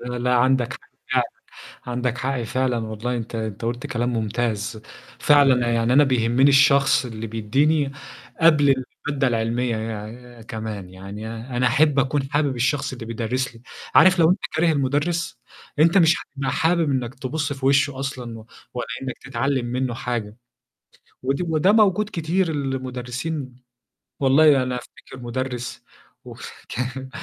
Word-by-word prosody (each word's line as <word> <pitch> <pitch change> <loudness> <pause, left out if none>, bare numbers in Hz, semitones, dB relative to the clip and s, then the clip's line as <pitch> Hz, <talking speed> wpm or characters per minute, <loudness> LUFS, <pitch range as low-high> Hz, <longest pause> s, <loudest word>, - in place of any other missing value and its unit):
لأ، 125 0 -4
لأ، 125 +1 +1
عندك 130 0 +2
حق - - -9 0.3
فعلًا، - - +3 0.6
عندك 125 0 -2
حق 130 -2 -2
فعلًا 125 +1 0
والله 110 +2 -3
أنت 115 0 -6
أنت 110 0 -4
قُلت 120 +2 -3
كلام 120 +1 -1
مُمتاز، 110 -1 -2 0.4
فعلًا 135 -5 +4
يعني 115 +1 +1
أنا 145 +2 +6
بيهمّني 125 +1 +3
الشخص 140 -1 +5
اللي 115 -2 -6
بيدّيني 135 +7 +1 0.5
قبل 145 -5 +4 0.2
المادة 140 -2 +1
العلمية 115 +1 0
يع 115 +2 -7
كمان، 110 -5 -6
يعني 100 +3 -8 0.3
أنا 125 +1 +2
أحب 145 +2 +3
أكون 135 +1 +1
حابب 145 -3 +1
الشخص 130 +3 0
اللي 120 -3 -7
بيدرّس 120 +2 -2
لي، 115 - -16 0.3
عارف 185 -1 +7
لو 165 0 +5
أنت 190 - +2 0.2
كاره 165 0 +3
المدرس 145 +4 -1 0.4
أنت 165 +5 +5
مش 165 -1 +5
هتبقى 135 -2 -4
حابب 165 -2 +2
إنّك 130 -2 -2
تبُص 145 +1 -3
في 135 -1 -4
وِشّه 135 0 +3
أصلًا، 125 -4 -5
و 110 - -14 0.3
ولا 125 - -3 0.2
إنّك 130 -1 -5
تتعلّم 135 0 -2
منّه 125 0 -2
حاجة 115 -3 -4 0.9
ودي 135 +7 0
وده 165 +3 +2
موجود 210 -1 +3
كتير 170 +2 0
المدرسين 130 0 -4 0.7
والله 140 0 +5
أنا 125 -1 -2
أفتكر 130 +1 -11
مدرس 125 0 -4 0.4
وه - - -11 0.3
كان 130 +2 -4
130 Hz, 145 wpm, -23 LUFS, 120-140 Hz, 0.9 s, عارف